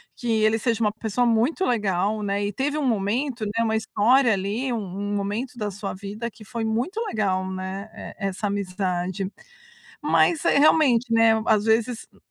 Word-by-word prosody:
que 240 - -5
ele 215 +1 +3
seja 230 0 -1
uma 210 -2 +2
pessoa 225 +2 -1
muito 240 +11 +2
legal, 210 -2 0
né, 200 0 -1
e 205 - -3
teve 290 +3 -1
um 300 - -1
momento, 230 +4 -1
né, 225 +3 -1
uma 220 0 +1
história 235 +4 +3
ali 210 +6 -1
um 235 - -1
um 200 +1 -4
momento 210 +6 -3
da 210 -3 -2
sua 200 0 -5
vida 205 +5 -6
que 215 - -15
foi 235 0 -4
muito 235 - -1
legal, 190 -4 0
né, 190 +2 -5 0.3
e 210 - -4
essa 195 +2 -3
amizade. 185 -1 -2 0.7
Mas 330 -3 +2
é - - +4
realmente, 260 -6 +4
né, 225 0 +5
às 215 -2 +3
vezes, 225 +1 +1
hum, - - -23
220 Hz, 180 wpm, -24 LUFS, 200-235 Hz, 0.7 s, né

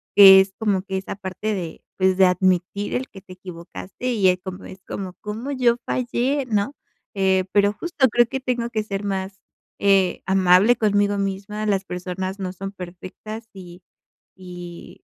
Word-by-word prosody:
Que 195 -1 +10
es 190 0 -4
como 205 -4 +1
que 190 0 -4
esa 190 - -5
parte 195 +2 -4
de 175 -5 -6
pues 185 -1 +2
de 190 - +6
admitir 185 +2 +1
el 255 +1 -2
que 195 - -13
te 185 -1 -13
equivocaste 170 - -7
y 200 -5 +4
es 180 0 +1
como 185 0 -7
es 190 - -11
como 190 -2 -5
¿cómo 220 +6 -5
yo 245 -3 +2
fallé, 255 +2 -1
¿no? 215 +5 -1 0.4
Eh, 190 -1 +2
pero 205 0 +3
justo 295 +1 +1
creo 240 +2 +4
que 265 +3 -3
tengo 245 -2 -2
que 220 - 0
ser 200 -1 -4
más, 195 -1 -3 0.4
eh, 195 -2 +2
amable 190 +4 +5
conmigo 205 -2 +2
misma. 200 +2 -3
Las 195 -2 0
personas 185 +2 -5
no 185 -1 -4
son 195 +1 -6
perfectas 190 +4 -9
y 180 -2 -12 0.5
y 175 -2 -10
195 Hz, 170 wpm, -22 LUFS, 185-215 Hz, 0.5 s, Que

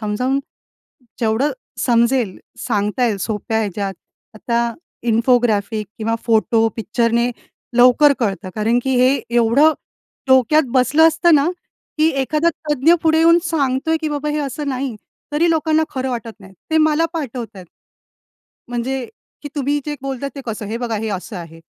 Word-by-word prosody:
समजावून, 250 +6 -1 0.8
जेवढं 230 +5 +1 0.3
समजेल, 235 -3 +2 0.3
सांगता 210 +5 0
येईल, 220 -3 0
सोप्या 220 +2 -2
ह्याच्यात. 200 -2 -3 0.4
आता 235 +1 -1 0.4
इन्फोग्राफिक 225 -3 +1
किंवा 225 +1 -1
फोटो, 225 0 +2
पिक्चरने 235 +2 0 0.5
लवकर 250 +4 +6
कळतं. 200 -3 -2
कारण 225 +3 +1
की 265 - 0
हे 255 +2 +4 0.2
एवढं 240 +7 +4 0.6
डोक्यात 260 +4 +5
बसलं 275 +5 +5
असतं 325 +1 +3
ना, 290 +3 +3 0.5
की 310 - +4
एखादा 305 +5 +1 0.2
तज्ञ 295 +4 +4
पुढे 320 0 +3
येऊन 335 +1 +6
सांगतो 280 -3 0
आहे, 320 - +2
की 310 - 0
"बाबा 295 0 -3
हे 300 - -1
असं 290 0 -3
नाही." 260 -2 -3 0.4
तरी 330 +3 +2
लोकांना 315 -1 +2
खरं 260 -1 -3
वाटत 230 -3 -6
नाही, 190 -1 -14 0.2
ते 315 - +2
मला 310 +1 +3
पाठवत 245 -8 -5
आहेत. 185 -2 -11 1.0
म्हणजे, 245 +2 -3 0.4
की 290 - -6
"तुम्ही 285 0 0
जे 295 - -2
बोलत 270 -1 -5
आहे 275 - -3
ते 275 - -7
कसं? 220 -2 -4
हे 220 +3 -3
बघा 235 -2 -2
हे 220 - -3
असं 200 +2 -9
आहे." 165 -1 -9
250 Hz, 155 wpm, -19 LUFS, 225-295 Hz, 1.0 s, लवकर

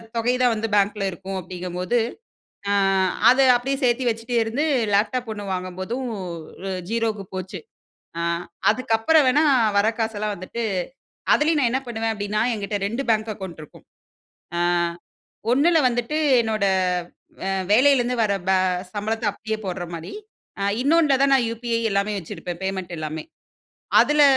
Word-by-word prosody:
தொகை 230 +2 +1
தான் 250 -1 +4
வந்து 225 0 -2
பேங்க்ல 205 0 +2
இருக்கும் 190 +1 -6
அப்டிங்கும்போது, 180 +3 -3 0.7
ஆ - - +2 0.6
அது 260 +2 +5
அப்டியே 265 +3 -1
சேத்து 245 0 +2
வச்சுட்டே 230 +1 -2
இருந்து 230 +7 -1 0.3
லேப்டாப் 230 +4 +1
1 205 -1 -7
வாங்கும்போதும் 185 +8 -4 0.8
0க்கு 225 -3 -1
போச்சு. 185 0 -5 0.6
ஆ - - -1 0.5
அதுக்கப்பறம் 255 +6 +3
வேணா 295 +5 +4 0.3
வர 200 - +3
காசெல்லாம் 215 -2 -1
வந்துட்டு, 205 +6 -5 0.7
அதுலயும் 310 +1 +2
நான் 240 - +2
என்ன 260 - +1
பண்ணுவேன் 225 -1 -2
அப்டின்னா? 210 +1 -1
என்கிட்ட 205 -1 -3
2 230 +6 -2
பேங்க் 220 0 +1
அக்கவுண்ட் 185 -5 -8
இருக்கும். - - -18 0.7
ஆ - - 0 0.9
ஒண்ணுல 320 +6 +4
வந்துட்டு 245 +5 -2 0.3
என்னோட 215 -2 -1 0.8
அ - - 0 0.2
வேலைல 275 +6 +6
இருந்து 245 +1 -1
வர 205 - +1 0.2
ப - - +4 0.4
சம்பளத்த 220 +3 -2
அப்டியே 220 +1 -4
போடுற 180 -1 -3
மாரி. 165 0 -7 0.5
அ - - -1 0.2
இன்னொன்னுல 300 -1 +4
தான் 275 0 +4
நான் 255 -3 +3
யுபிஐ 230 0 -2
எல்லாமே 200 +1 0
வச்சிருப்பேன் 175 0 -7
பேமெண்ட் 190 -2 -3
எல்லாமே. 155 0 -5 0.8
அதுல 295 0 +4
225 Hz, 140 wpm, -23 LUFS, 195-245 Hz, 0.9 s, வேலைல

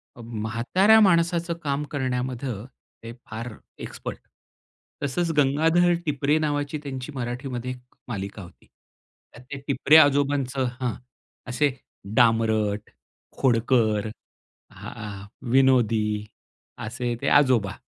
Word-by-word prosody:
अ, 120 - -11
म्हाताऱ्या 115 - +2
माणसाचं 170 -2 +3
काम 140 0 -1
करण्यामध्ये 130 -2 -2 0.5
ते 115 +1 -7
फार 115 +1 -6 0.3
एक्सपर्ट. - - -7 0.8
तसंच 165 +5 0
"गंगाधर 160 +5 +3
टिपरे" 145 +1 +1
नावाची 145 -1 -1
त्यांची 130 0 -6
मराठीमध्ये 125 0 -4
एक 125 -1 -9 0.3
मालिका 100 -2 -5
होती. 85 - -16 0.7
त्यात 125 +1 -15
ते 140 - -4
टिपरे 145 +2 +5
आजोबांचं 140 -3 +3 0.2
हां. 125 -3 0 0.5
असे 140 +3 +1 0.4
डामरट, 110 -3 +2 0.5
खोडकर, 115 -4 +2 0.6
अ, 105 -3 -8 0.3
विनोदी, 115 -5 +3 0.6
असे 120 +1 -3
ते - - -2
आजोबा. 125 -9 +4
125 Hz, 100 wpm, -25 LUFS, 115-145 Hz, 0.8 s, टिपरे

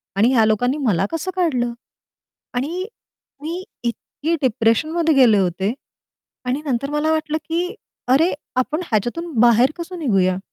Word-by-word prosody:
आणि 225 +6 +4
ह्या 225 -3 +5
लोकांनी 245 +6 +1
मला 195 -3 +2
कसं 330 +3 -3
काढलं? 255 -10 0 0.8
आणि 325 +10 -2 0.6
मी 340 +4 -4 0.2
इतकी 290 +7 -2
डिप्रेशनमध्ये 300 +8 +2
गेले 240 -6 +6
होते 190 +3 0 0.7
आणि 260 +4 -1
नंतर 275 +1 -1
मला 295 +2 0
वाटलं 310 -1 0
की 355 +4 -1 0.3
अरे 300 +8 +4 0.2
आपण 300 +6 0
ह्याच्यातून 245 - -2
बाहेर 240 +3 +5
कसं 350 +1 -6
निघूया 190 - +2
265 Hz, 130 wpm, -21 LUFS, 230-325 Hz, 0.8 s, गेले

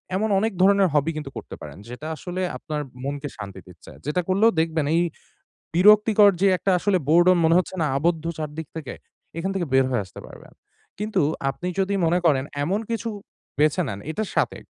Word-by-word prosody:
এমন 215 +3 0
অনেক 220 +3 0
ধরনের 195 0 +5
হবি 150 +2 +2
কিন্তু 150 -3 -6
করতে - - -8
পারেন। - - -9
যেটা 125 +6 -7
আসলে 180 +3 -5 0.2
আপনার 150 -2 -4 0.2
মনকে 140 +1 -4
শান্তি 100 -3 -8
দিচ্ছে। 90 -3 -14
যেটা 150 +5 0
করলেও 205 +5 +4
দেখবেন 160 -2 0
এই 170 - +3 0.7
বিরক্তিকর 210 +3 +6
যে 200 - +5
একটা 195 - 0
আসলে 200 +1 +2
boredom 175 +3 +5
মনে 165 +1 +4
হচ্ছে 185 - 0
না - - +2
আবদ্ধ 165 +2 0
চারদিক 155 0 -5
থেকে? 155 -5 -6 0.4
এখান 185 +4 -2
থেকে 185 -3 -1
বের 135 0 +5
হয়ে 120 -5 0
আসতে 90 - -12
পারবেন। - - -14 0.5
কিন্তু 210 +1 0 0.3
আপনি 175 +6 -5
যদি 195 +1 +1
মনে 170 +2 +2
করেন 140 -5 +3 0.2
এমন 190 +8 0
কিছু 230 0 -2 0.5
বেছে 155 +4 +3
নেন 100 -5 -5
এটার 215 +4 -3
সাথে, - - +1
165 Hz, 185 wpm, -23 LUFS, 150-195 Hz, 0.7 s, বিরক্তিকর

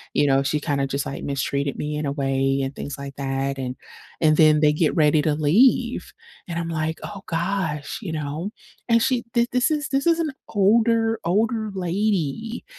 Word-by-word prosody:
you 145 - +4
know, 135 0 +4
"She 150 +2 0
kinda 140 -2 0
just, 140 +1 -2
like, 140 - -6
mistreated 140 0 -2
me 150 0 -3
in 150 - -2
a - - -1
way," 135 -1 0
and 135 +1 -4
things 145 - -6
like 140 -1 -8
that, 135 0 -2
and 130 -1 -4 0.5
and 155 -1 +4
then 155 -1 +5
they 150 -1 +4
get 155 0 +1
ready 150 -1 +4
to 150 -1 +1
leave, 235 - +2 0.3
and 170 -2 -4
I'm 170 -1 -3
like, 160 0 -2
"Oh 200 -2 -7
gosh," 170 0 -2
you 190 - -5
know? 155 +5 -3 0.4
And 230 0 +4
she 250 -2 +1
th 235 0 +3
this 250 +3 +2
is 300 0 -1
this 275 +3 0
is 335 -1 +4
an 315 -3 0 0.2
older, 225 +2 +3
older 220 +4 +1
lady, 195 - -1
160 Hz, 190 wpm, -23 LUFS, 140-220 Hz, 0.5 s, then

